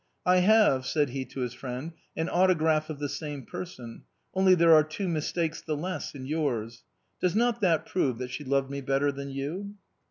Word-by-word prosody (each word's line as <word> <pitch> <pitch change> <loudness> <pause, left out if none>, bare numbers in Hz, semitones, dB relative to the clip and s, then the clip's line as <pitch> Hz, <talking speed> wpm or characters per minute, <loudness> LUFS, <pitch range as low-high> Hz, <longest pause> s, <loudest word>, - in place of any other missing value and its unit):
" - - -47
I 180 0 +5
have," 180 -9 +4
said 150 -3 +1
he 130 +1 -4
to 130 +1 -7
his 125 -1 -2
friend, 130 +4 -6
" - - -28
an 160 - 0
autograph 160 -4 +2
of 155 - -5
the 145 0 -2
same 145 -2 -5
person; 125 -10 -8 0.3
only 190 -1 +5
there 165 -1 +6
are 155 -1 +7
two 155 +6 -4
mistakes 160 0 -1
the 155 -2 -3
less 180 +5 -4
than 135 -2 -8
in - - -7
yours. 120 -7 -2 0.4
Does 180 +1 +1
not 235 +1 +2
that 170 -6 +2
prove 130 -10 0
that 125 0 -5
she 150 - -5
loved 135 0 0
me 140 0 -4
better 135 +2 +1
than 140 0 -6
you 165 +10 -5
150 Hz, 215 wpm, -28 LUFS, 135-180 Hz, 0.4 s, are